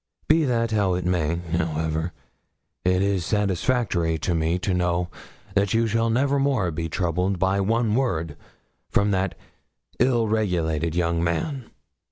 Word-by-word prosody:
Be 155 Hz, 0 st, +4 dB
that 115 Hz, -3 st, 0 dB
how 100 Hz, -4 st, +2 dB
it 90 Hz, -1 st, -3 dB
may, 85 Hz, -3 st, +1 dB
however, 80 Hz, -1 st, -2 dB, 0.7 s
it 90 Hz, +1 st, +2 dB
is 100 Hz, -3 st, +1 dB
satisfactory 100 Hz, -3 st, 0 dB
to 85 Hz, -, -1 dB
me 80 Hz, +1 st, +1 dB
to 95 Hz, +1 st, -1 dB
know 90 Hz, -1 st, 0 dB, 0.4 s
that 100 Hz, +1 st, +2 dB
you 115 Hz, 0 st, +3 dB
shall 115 Hz, +1 st, +1 dB
never 140 Hz, +4 st, +2 dB
more 130 Hz, -11 st, +1 dB
be 80 Hz, +1 st, -3 dB
troubled 90 Hz, +3 st, 0 dB
by 95 Hz, +2 st, +1 dB
one 115 Hz, +2 st, +1 dB
word 85 Hz, -, 0 dB, 0.5 s
from 100 Hz, 0 st, +2 dB
that 95 Hz, -1 st, 0 dB, 0.6 s
ill 120 Hz, -2 st, +3 dB
regulated 85 Hz, -7 st, 0 dB
young 85 Hz, -1 st, +1 dB
man. 115 Hz, -, -2 dB
95 Hz, 145 wpm, -24 LUFS, 85-115 Hz, 0.7 s, Be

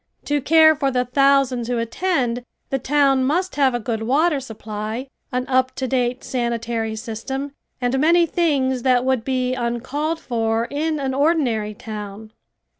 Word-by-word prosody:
To 290 Hz, 0 st, 0 dB
care 315 Hz, +2 st, +6 dB
for 280 Hz, -2 st, 0 dB
the 250 Hz, -1 st, 0 dB
thousands 270 Hz, -2 st, +2 dB
who 245 Hz, -1 st, -1 dB
attend, 245 Hz, 0 st, -1 dB, 0.3 s
the 270 Hz, -, 0 dB
town 275 Hz, 0 st, +2 dB
must 350 Hz, +8 st, 0 dB
have 270 Hz, -3 st, +3 dB
a -, -, -1 dB
good 225 Hz, -1 st, -3 dB
water 285 Hz, +6 st, +2 dB
supply, 220 Hz, 0 st, -6 dB, 0.2 s
an 250 Hz, 0 st, -1 dB
up 260 Hz, 0 st, +1 dB
to 260 Hz, -, -2 dB
date 250 Hz, -1 st, -1 dB
sanitary 235 Hz, -2 st, -2 dB
system, 235 Hz, +5 st, -5 dB, 0.3 s
and 250 Hz, +1 st, 0 dB
many 335 Hz, +4 st, +4 dB
things 280 Hz, -7 st, +1 dB
that 250 Hz, 0 st, +2 dB
would 260 Hz, -3 st, +1 dB
be 255 Hz, -1 st, 0 dB
uncalled 260 Hz, +6 st, -2 dB
for 225 Hz, -4 st, -1 dB
in 305 Hz, +2 st, -1 dB
an 265 Hz, -1 st, -2 dB
ordinary 260 Hz, -8 st, +1 dB
town. 210 Hz, 0 st, -8 dB
255 Hz, 155 wpm, -21 LUFS, 235-285 Hz, 0.3 s, care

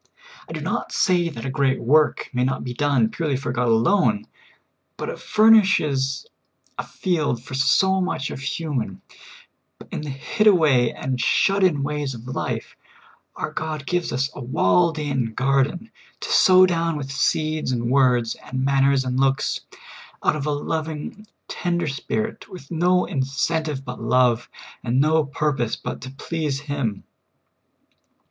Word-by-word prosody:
I -, -, -8 dB
do -, -, -5 dB
not -, -, -3 dB
say 175 Hz, -2 st, +2 dB
that 120 Hz, -5 st, -8 dB
a 135 Hz, -, -2 dB
great 135 Hz, 0 st, +1 dB
work 150 Hz, +5 st, +2 dB
may 125 Hz, 0 st, +1 dB
not 135 Hz, +1 st, -1 dB
be 125 Hz, -, -5 dB
done 130 Hz, -4 st, +2 dB
purely 150 Hz, -2 st, -2 dB
for 130 Hz, -, -4 dB
God 125 Hz, 0 st, 0 dB
alone, 200 Hz, -, +2 dB, 0.7 s
but -, -, -4 dB
it -, -, -6 dB
furnishes 190 Hz, -12 st, +3 dB, 0.5 s
a -, -, -1 dB
field 150 Hz, -10 st, -1 dB
for 145 Hz, -, -10 dB
so 190 Hz, +8 st, +3 dB
much 180 Hz, -7 st, -2 dB
of -, -, -6 dB
human; 140 Hz, -, -3 dB, 0.7 s
but -, -, -15 dB
in -, -, -4 dB
the 150 Hz, -, -6 dB
hid 215 Hz, +11 st, -1 dB
away 145 Hz, -, +4 dB
and 130 Hz, -2 st, -3 dB
shut 195 Hz, 0 st, +2 dB
in 155 Hz, -7 st, +2 dB
ways 145 Hz, -2 st, -2 dB
of 115 Hz, +1 st, -11 dB
life, 130 Hz, -, -4 dB, 0.6 s
our -, -, -4 dB
God 155 Hz, -2 st, -4 dB
gives 175 Hz, +1 st, -1 dB
us 135 Hz, +4 st, -1 dB
a -, -, -9 dB
walled 145 Hz, -, +2 dB
in 135 Hz, -7 st, -2 dB
garden 135 Hz, -, 0 dB, 0.3 s
to -, -, -5 dB
vSOW 185 Hz, -2 st, +6 dB
down 165 Hz, -3 st, 0 dB
with 135 Hz, -2 st, -6 dB, 0.2 s
deeds 155 Hz, -3 st, -2 dB
and 120 Hz, -1 st, -1 dB
words 125 Hz, -4 st, +3 dB
and 130 Hz, 0 st, -3 dB
manners 135 Hz, -1 st, +3 dB
and 130 Hz, 0 st, -1 dB
looks, 135 Hz, 0 st, +1 dB, 0.6 s
out 155 Hz, -, +2 dB
of 150 Hz, -1 st, -3 dB
a -, -, +1 dB
loving, 160 Hz, +7 st, -4 dB, 0.2 s
tender 175 Hz, -1 st, -2 dB
spirit, 215 Hz, +10 st, -3 dB
with 175 Hz, -6 st, -11 dB
no 180 Hz, +2 st, +2 dB
incentive 145 Hz, 0 st, -2 dB
but -, -, -7 dB
love, 120 Hz, 0 st, +2 dB, 0.3 s
and 120 Hz, +1 st, +1 dB
no 155 Hz, +2 st, +3 dB
purpose 135 Hz, -4 st, -1 dB
but -, -, -6 dB
to 130 Hz, -, -7 dB
please 145 Hz, 0 st, -3 dB
Him. 140 Hz, -8 st, -3 dB
140 Hz, 155 wpm, -22 LUFS, 130-165 Hz, 0.7 s, vSOW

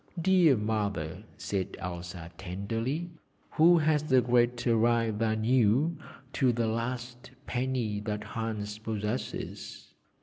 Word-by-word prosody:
'Dear 175 Hz, -6 st, +5 dB
Mother,' 100 Hz, -7 st, -2 dB
said 95 Hz, -2 st, -3 dB
Elsa 90 Hz, -1 st, -6 dB
tenderly, 115 Hz, -, -3 dB, 0.4 s
'who 170 Hz, +2 st, +6 dB
has 155 Hz, -2 st, +1 dB
a 130 Hz, -, +7 dB
greater 120 Hz, -1 st, +2 dB
right 115 Hz, 0 st, +3 dB
than 110 Hz, -1 st, 0 dB
you 125 Hz, +7 st, +3 dB, 0.4 s
to 130 Hz, -2 st, +3 dB
the 115 Hz, -1 st, 0 dB
last 120 Hz, +2 st, -3 dB, 0.2 s
penny 125 Hz, -5 st, -1 dB
that 105 Hz, 0 st, -4 dB
Hans 110 Hz, -1 st, -4 dB
possesses? 110 Hz, +2 st, -5 dB
115 Hz, 110 wpm, -29 LUFS, 105-130 Hz, 0.4 s, a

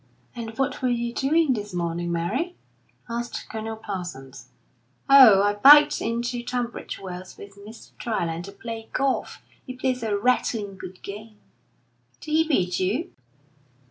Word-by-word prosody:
"And 225 Hz, -2 st, -7 dB
what 270 Hz, +1 st, -1 dB
were 255 Hz, -, +1 dB
you 235 Hz, -1 st, -1 dB
doing 300 Hz, +2 st, +2 dB
this 210 Hz, -4 st, -5 dB
morning, 170 Hz, 0 st, -2 dB
Mary?" 230 Hz, -, -2 dB, 0.5 s
asked 235 Hz, 0 st, -5 dB
Colonel 220 Hz, 0 st, -5 dB
Parsons. 155 Hz, -, -7 dB, 0.6 s
"Oh, 250 Hz, -8 st, +8 dB
I 205 Hz, 0 st, +2 dB
biked 295 Hz, +7 st, +7 dB
in 230 Hz, +1 st, -1 dB
to 240 Hz, 0 st, -3 dB
Tunbridge 240 Hz, -1 st, -4 dB
Wells 185 Hz, -1 st, -9 dB
with 200 Hz, 0 st, -12 dB
Mr. 210 Hz, +3 st, -13 dB
Dryland 170 Hz, -7 st, -2 dB
to 200 Hz, -, -9 dB
play 225 Hz, +2 st, -8 dB
golf. 275 Hz, -1 st, -1 dB, 0.2 s
He 255 Hz, -, -8 dB
plays 255 Hz, -1 st, -1 dB
a 215 Hz, -3 st, -1 dB
rattling 215 Hz, -3 st, 0 dB
good 185 Hz, -1 st, -11 dB
game." 215 Hz, +2 st, -9 dB, 0.8 s
"Did 310 Hz, -, -8 dB
he 320 Hz, +1 st, +3 dB
beat 180 Hz, -, +1 dB
you?" 210 Hz, -, -1 dB
225 Hz, 145 wpm, -24 LUFS, 195-250 Hz, 0.8 s, Oh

